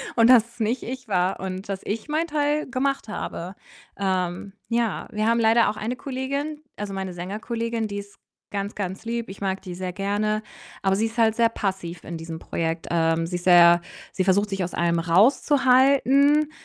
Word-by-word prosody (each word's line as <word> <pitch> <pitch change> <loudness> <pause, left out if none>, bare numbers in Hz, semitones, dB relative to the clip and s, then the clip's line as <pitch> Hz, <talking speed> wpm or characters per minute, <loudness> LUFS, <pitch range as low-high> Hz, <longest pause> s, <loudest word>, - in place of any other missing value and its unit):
und 230 0 +5
dass 230 -3 +7
es - - -21
nicht 230 +4 0
ich 255 0 -6
war 185 -1 0
und 190 +1 -5
dass 195 -1 -3
ich 215 +6 -3
mein 315 +2 +1
Teil 295 0 0
gemacht 270 -2 -1
habe. 185 -2 -5 0.4
Ähm, 185 0 -2 0.2
ja, 230 -3 -1
wir 215 +1 -1
haben 235 0 +3
leider 225 -1 +4
auch 215 - -4
eine 235 +4 -3
Kollegin 280 +3 -4 0.2
also 205 -1 -5
meine 190 -1 -4
Sängerkollegin, 225 +5 -3
die 200 0 -4
ist 200 0 -12 0.3
ganz, 200 0 -3
ganz 195 +1 -5
lieb, 235 -1 -3
ich 195 - -9
mag 190 -1 -2
die 180 -2 -7
sehr 180 0 -4
gerne, 210 +2 -1 0.4
aber 195 0 +3
sie 220 +3 +1
ist 225 +2 -10
halt 220 -1 +4
sehr 230 -1 +3
passiv 190 -6 -4
in 170 -1 -5
diesem 165 0 -7
Projekt. 165 0 -3
Ähm, 165 0 +1
sie 180 - -4
ist 175 - -9
sehr 175 -1 +7 0.3
sie 185 - 0
versucht, 200 +2 +3
sich 195 -2 -2
aus 175 - -5
allem 170 0 +1
rauszuhalten 270 - +4
205 Hz, 190 wpm, -24 LUFS, 185-235 Hz, 0.4 s, dass